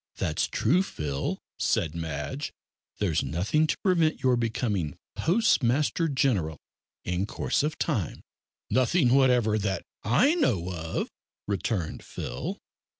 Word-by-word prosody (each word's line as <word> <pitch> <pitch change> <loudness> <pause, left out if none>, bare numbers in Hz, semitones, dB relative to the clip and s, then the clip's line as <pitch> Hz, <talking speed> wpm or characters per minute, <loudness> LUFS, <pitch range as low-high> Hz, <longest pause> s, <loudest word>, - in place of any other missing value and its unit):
"That's 75 - 0
true, 165 +12 +2
Phil," 75 - -3 0.2
said 75 - +1
Madge; 80 - -4 0.5
"there's 90 -7 +1
nothing 95 - +1
to - - 0
prevent 170 -6 +2
your 130 -1 +4
becoming 110 - -1 0.2
Postmaster 160 - +2
General 120 - +1 0.5
in 90 +3 -1
course - - 0
of 155 +2 -1
time." 115 - -2 0.5
"Nothing 130 +1 +3
whatever, 125 -5 +4
that 100 -2 -1 0.2
I 250 - +4
know 95 - +1
of," 80 -2 -3 0.4
returned 100 -4 -2
Phil. - - -5
115 Hz, 115 wpm, -27 LUFS, -, 0.5 s, your